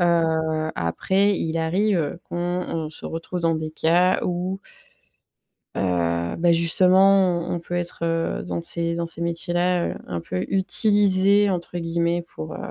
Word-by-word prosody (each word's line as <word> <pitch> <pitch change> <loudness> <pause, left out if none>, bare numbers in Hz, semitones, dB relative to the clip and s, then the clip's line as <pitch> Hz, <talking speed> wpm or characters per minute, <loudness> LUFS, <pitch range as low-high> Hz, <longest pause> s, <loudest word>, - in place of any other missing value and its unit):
Heu, 160 -2 +1
après, 190 - +1
il 165 0 -2
arrive 170 -1 0
qu'on - - -5
on 175 -3 -3
se 160 - -5
retrouve 165 +2 -5
dans 165 -1 +1
des 155 0 -4
cas 170 +4 +2
où 180 +2 -2 1.2
heu, 85 -2 -1
ben 170 0 +3
justement, 185 +2 +4
on - - -1
on - - -3
peut 170 +1 -9
être, 175 0 -4
heu, 165 - -1
dans 85 -1 -4
ces 170 - -2
dans 170 0 -3
ces 165 0 -6
métiers 170 +1 -2
là, 175 0 +1
heu, - - -3
un 85 -1 -4
peu 90 +2 -4
«utilisés» 200 0 +3
entre 175 -1 -3
guillemets 170 +1 -1
pour, 80 - -9
heu, - - -7
170 Hz, 160 wpm, -23 LUFS, 160-180 Hz, 1.2 s, justement